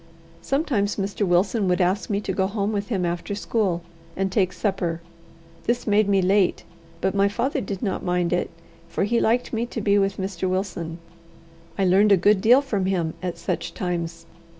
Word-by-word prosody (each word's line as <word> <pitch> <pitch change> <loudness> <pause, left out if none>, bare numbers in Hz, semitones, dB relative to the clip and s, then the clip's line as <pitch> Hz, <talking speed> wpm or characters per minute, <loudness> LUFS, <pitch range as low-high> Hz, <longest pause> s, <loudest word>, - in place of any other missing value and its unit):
Sometimes 250 - 0
Mr. 200 0 -1
Wilson 190 +4 +2
would 180 +1 +2
ask 185 +3 +1
me 200 -1 +1
to 190 - -3
go 190 0 +1
home 205 0 -1
with 205 -1 -2
him 195 -7 -1
after 175 +3 -3
school, 200 -5 -1 0.3
and 195 0 0
take 190 -2 +2
supper. 185 -6 -2 0.7
This 240 +1 0
made 210 -1 +3
me 195 -2 +3
late, 195 0 +2 0.4
but 190 - +1
my 200 0 +3
father 240 +7 -1
did 195 -1 -5
not 195 -4 -1
mind 180 -1 0
it, 175 - 0 0.4
for - - -1
he 230 +4 +2
liked 240 +3 +1
me 230 +1 -1
to 235 - -5
be 205 -1 +3
with 195 0 0
Mr. 190 -1 -2
Wilson. 185 -3 -3 0.8
I 195 - +2
learned 195 +3 +4
a 200 - +7
good 200 +2 +3
deal 245 +6 +6
from 205 -9 -1
him 170 -4 0
at 180 -2 -3
such - - -3
times. 170 -2 -3
195 Hz, 190 wpm, -24 LUFS, 180-210 Hz, 0.8 s, a